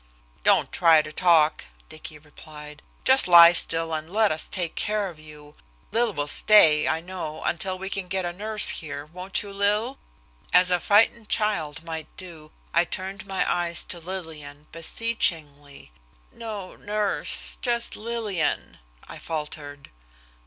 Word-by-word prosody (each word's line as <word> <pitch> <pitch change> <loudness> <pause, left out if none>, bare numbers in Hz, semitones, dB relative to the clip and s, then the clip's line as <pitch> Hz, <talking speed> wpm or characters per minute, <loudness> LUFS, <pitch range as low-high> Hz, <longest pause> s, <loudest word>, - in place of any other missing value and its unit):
"Don't - - +3
try 165 -3 +4
to 155 - -10
talk," 160 -3 +2 0.2
Dicky 155 0 -11
replied. 150 0 -13 0.2
"Just 265 -3 +6
lie 170 -1 +9
still 165 -1 +2
and 155 +1 -5
let 215 +1 +2
us 155 0 -1
take 175 -3 -4
care 210 -2 -2
of 165 -3 -14
you. 150 -1 -14 0.4
Lil 235 0 +1
will 145 -6 -3
stay, 155 -2 +5
I - - 0
know, 170 -3 -7
until 185 +2 -1
we 190 +1 -6
can 195 -1 -4
get 190 0 -2
a 175 - -4
nurse 215 +3 +2
here, 145 -2 -4
won't 180 +6 -4
you, 200 -1 -10
Lil?" 210 +6 0 0.5
As 180 0 +5
a 180 - +2
frightened 215 +3 +2
child 170 -9 -1
might 160 -2 -6
do, 165 -5 -9 0.2
I 170 - +4
turned 190 +2 -7
my 195 -1 -1
eyes 170 -1 -1
to 175 - -3
Lillian, 160 -5 -8
beseechingly. 155 - -2 0.4
"No 210 -5 -8
nurse 210 0 0
just 235 -2 -2
Lillian," 215 -8 -3 0.3
I - - -10
faltered. 150 -2 -7
175 Hz, 145 wpm, -24 LUFS, 155-200 Hz, 0.5 s, lie